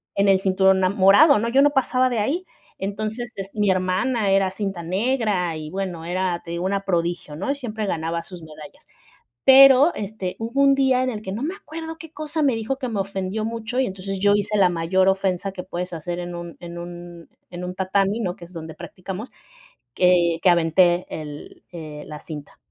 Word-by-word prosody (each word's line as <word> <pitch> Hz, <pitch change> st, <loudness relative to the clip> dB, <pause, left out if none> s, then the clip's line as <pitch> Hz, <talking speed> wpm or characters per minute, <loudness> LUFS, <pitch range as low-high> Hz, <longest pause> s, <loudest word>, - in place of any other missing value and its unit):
en 200 Hz, 0 st, +2 dB
el 195 Hz, -1 st, +5 dB
cinturón 190 Hz, 0 st, +3 dB
ama 185 Hz, +2 st, +1 dB
morado, 205 Hz, +9 st, +6 dB
¿no?, 230 Hz, +2 st, -1 dB
yo 265 Hz, +3 st, +4 dB
no 290 Hz, -, +6 dB
pasaba 255 Hz, -2 st, +2 dB
de 240 Hz, -3 st, -1 dB
ahí 310 Hz, -, -1 dB, 0.3 s
entonces, 215 Hz, +5 st, -4 dB
es 195 Hz, 0 st, -6 dB
mi 210 Hz, -2 st, +1 dB
hermana 190 Hz, +4 st, +1 dB
era 195 Hz, -1 st, +3 dB
cinta 195 Hz, -2 st, -4 dB
negra 195 Hz, -2 st, 0 dB
y 155 Hz, -1 st, -7 dB
bueno 180 Hz, -3 st, -4 dB
era 180 Hz, 0 st, -1 dB
te 170 Hz, -, -8 dB
digo 170 Hz, +1 st, -3 dB
una 195 Hz, +1 st, -1 dB
prodigio, 170 Hz, -4 st, -1 dB
¿no?, 190 Hz, -, -4 dB
y 285 Hz, -, -1 dB
siempre 220 Hz, -5 st, -4 dB
ganaba 165 Hz, -2 st, -2 dB
sus 180 Hz, -2 st, -11 dB
medallas. 155 Hz, -2 st, -13 dB, 0.6 s
Pero 270 Hz, +3 st, +8 dB
este 200 Hz, -3 st, -5 dB
hubo 230 Hz, +5 st, -1 dB
un 275 Hz, 0 st, +5 dB
día 265 Hz, -2 st, +3 dB
en 255 Hz, -, 0 dB
el 215 Hz, -3 st, -5 dB
que 190 Hz, -, -5 dB
no 215 Hz, -, -4 dB
me 335 Hz, +7 st, -2 dB
acuerdo 325 Hz, -4 st, -8 dB
qué 325 Hz, -1 st, -11 dB
cosa 305 Hz, 0 st, -3 dB
me 270 Hz, -, +3 dB
dijo 225 Hz, +4 st, -2 dB
que 260 Hz, -2 st, -4 dB
me 210 Hz, -3 st, -2 dB
ofendió 195 Hz, +2 st, -3 dB
mucho 230 Hz, +2 st, -3 dB
y 265 Hz, -, +2 dB
entonces 195 Hz, 0 st, -5 dB
yo 205 Hz, +1 st, +4 dB
hice 205 Hz, +1 st, -1 dB
la 190 Hz, -3 st, +5 dB
mayor 175 Hz, +3 st, +2 dB
ofensa 190 Hz, 0 st, 0 dB
que 185 Hz, -1 st, -7 dB
puedes 180 Hz, 0 st, -5 dB
hacer 175 Hz, +2 st, -4 dB
en 175 Hz, 0 st, -5 dB
un 170 Hz, -1 st, -8 dB
en 175 Hz, 0 st, -8 dB
un 175 Hz, -1 st, -9 dB, 0.2 s
en 175 Hz, 0 st, -7 dB
un 180 Hz, 0 st, -5 dB
tatami, 195 Hz, +3 st, 0 dB
¿no?, 180 Hz, -5 st, -2 dB
que 170 Hz, -, -11 dB
es 175 Hz, -, -17 dB
donde 160 Hz, -2 st, -8 dB
practicamos, 185 Hz, +6 st, -8 dB, 0.6 s
que 175 Hz, -2 st, +3 dB
que 185 Hz, -, +4 dB
aventé 175 Hz, +1 st, +3 dB
el, 150 Hz, -2 st, -8 dB
eh, 155 Hz, -3 st, -8 dB
la 150 Hz, -1 st, -8 dB
cinta. 150 Hz, -3 st, -9 dB
190 Hz, 210 wpm, -23 LUFS, 175-225 Hz, 0.6 s, Pero